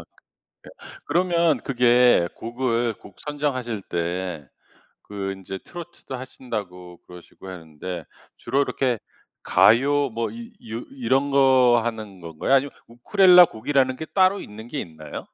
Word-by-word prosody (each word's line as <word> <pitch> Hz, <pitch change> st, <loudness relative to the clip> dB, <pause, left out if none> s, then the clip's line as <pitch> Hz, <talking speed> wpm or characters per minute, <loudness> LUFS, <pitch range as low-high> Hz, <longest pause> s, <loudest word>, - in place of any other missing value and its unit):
예 -, -, -12 dB, 1.0 s
그러면 170 Hz, -2 st, +2 dB
그게 125 Hz, -7 st, +4 dB
곡을 120 Hz, -1 st, -1 dB
곡 100 Hz, -, -17 dB
선정하실 130 Hz, -7 st, -3 dB
때 85 Hz, -4 st, -4 dB, 0.6 s
그 100 Hz, -1 st, -4 dB
인제 95 Hz, 0 st, -8 dB
트로트도 175 Hz, -6 st, -9 dB
하신다고 105 Hz, -9 st, -7 dB
그러시고 90 Hz, +1 st, -14 dB
헀는데 85 Hz, 0 st, -8 dB, 0.3 s
주로 140 Hz, -, 0 dB
이렇게 130 Hz, -3 st, 0 dB, 0.5 s
가요 140 Hz, +4 st, +4 dB
뭐 115 Hz, 0 st, -3 dB
이 235 Hz, 0 st, -10 dB, 0.2 s
요 115 Hz, -, -3 dB
이런 145 Hz, -, 0 dB
거 130 Hz, -3 st, +5 dB
하는 110 Hz, -5 st, -5 dB
건가요? 80 Hz, +9 st, -2 dB
아니면 135 Hz, +1 st, +3 dB, 0.2 s
우쿨렐레 180 Hz, -, +6 dB
곡이라는 130 Hz, +3 st, 0 dB
게 160 Hz, -, -5 dB
따로 190 Hz, +3 st, +2 dB
있는 110 Hz, +2 st, -10 dB
게 145 Hz, -, -4 dB
있나요? 80 Hz, -6 st, -8 dB
120 Hz, 275 characters per minute, -23 LUFS, 95-140 Hz, 1.0 s, 우쿨렐레